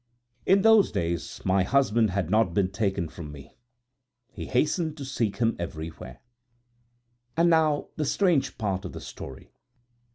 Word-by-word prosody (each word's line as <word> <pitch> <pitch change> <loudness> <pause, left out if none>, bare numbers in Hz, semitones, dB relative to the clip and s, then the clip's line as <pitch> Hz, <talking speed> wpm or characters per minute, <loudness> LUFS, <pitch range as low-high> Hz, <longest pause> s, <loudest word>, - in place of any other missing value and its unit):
In 195 +1 +5
those 220 -2 +6
days 85 0 -3
my 95 +1 +3
husband 115 0 +2
had 95 0 -2
not 105 -5 +2
been 95 -2 +1
taken 95 -4 -1
from 80 -1 -9
me; 70 -1 -13 0.8
he - - -7
hastened 155 +4 0
to 140 - -6
seek 115 -6 -2
him 115 -1 +1
everywhere. 80 -6 -7 1.2
"And 170 +1 +4
now 155 -2 +3
for - - -21
the 155 - 0
strange 170 -1 +1
part 100 -4 -2
of 90 - -7
the - - -7
story. 65 -1 -10
110 Hz, 155 wpm, -26 LUFS, -, 1.2 s, those